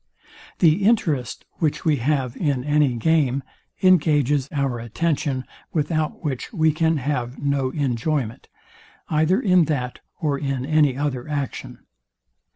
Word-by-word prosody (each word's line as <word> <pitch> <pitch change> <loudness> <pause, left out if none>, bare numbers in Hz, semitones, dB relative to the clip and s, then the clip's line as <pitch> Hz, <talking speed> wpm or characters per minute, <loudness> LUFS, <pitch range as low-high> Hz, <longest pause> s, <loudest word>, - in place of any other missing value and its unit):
The 170 +3 +4
interest, 170 - +1
which 155 -3 -1
we 155 -3 +3
have 130 -1 0
in 140 -6 -1
any 145 -3 +2
game, 140 0 +1 0.4
engages 150 -6 +3
our 135 -5 -1
attention, 135 +2 -1 0.3
without 155 +1 -1
which 135 -5 -3
we 160 -6 +2
can 160 +1 +1
have 130 -2 -2
no 140 -2 0
enjoyment, 130 -2 -2 0.6
either 160 +5 +2
in 180 -4 +4
that 125 -5 -2 0.2
or 145 -3 0
in 135 -3 -2
any 150 -3 +3
other 140 -3 -2
action. 145 -3 -5
145 Hz, 125 wpm, -23 LUFS, 130-155 Hz, 0.6 s, The